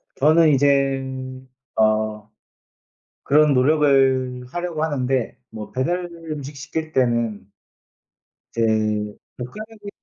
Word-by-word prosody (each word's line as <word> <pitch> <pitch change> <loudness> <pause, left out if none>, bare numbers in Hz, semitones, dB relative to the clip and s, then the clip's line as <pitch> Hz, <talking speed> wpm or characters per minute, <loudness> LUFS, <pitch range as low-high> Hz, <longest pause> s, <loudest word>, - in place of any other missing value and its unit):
저는 155 +3 +5
이젠 135 -2 0 0.3
어 110 -1 +1 0.9
그런 150 0 +4
노력을 130 -2 +3
하려고 175 -1 -3
하는데 130 -5 -1
뭐 110 -1 -8
배달 175 +8 -1 0.2
음식 145 -1 -6
시킬 155 +3 -5
때는 115 -6 0 1.1
이제 115 - 0 0.8
젓가락이 210 - -8
135 Hz, 185 characters per minute, -22 LUFS, 125-155 Hz, 1.1 s, 저는